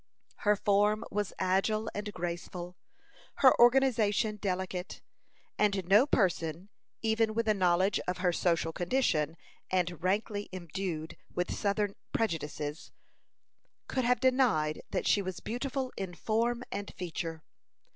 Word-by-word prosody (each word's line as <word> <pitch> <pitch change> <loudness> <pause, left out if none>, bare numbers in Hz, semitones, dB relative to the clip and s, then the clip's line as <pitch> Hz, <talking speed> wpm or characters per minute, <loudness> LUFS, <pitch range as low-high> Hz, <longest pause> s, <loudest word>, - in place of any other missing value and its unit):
Her 210 0 +3
form 205 +1 +2
was 205 -1 -1
agile 195 +4 +1
and 205 +1 -4
graceful, 175 0 -5 0.6
her 260 - +7
organization 230 -4 +4
delicate; 185 -2 -3 0.6
and 200 -3 +2
no 210 +8 +6
person, 175 - 0 0.3
even 220 0 +2
with 230 0 0
a 215 - +5
knowledge 185 0 +2
of 180 - -1
her 180 -1 +1
social 165 -2 +1
condition, 170 - 0 0.3
and 180 -2 0
rankly 205 +2 -1
imbued 175 -2 -5 0.2
with 180 0 -1
southern 205 0 0 0.2
prejudices, 150 -6 -2 1.0
could 260 - -1
have 250 -1 +3
denied 245 - +2
that - - -2
she 205 - +4
was 185 -2 -5
beautiful 255 +2 -3
in 185 -3 -5
form 235 +5 0
and 200 0 -4
feature. 165 -2 -5
195 Hz, 125 wpm, -31 LUFS, 175-220 Hz, 1.0 s, her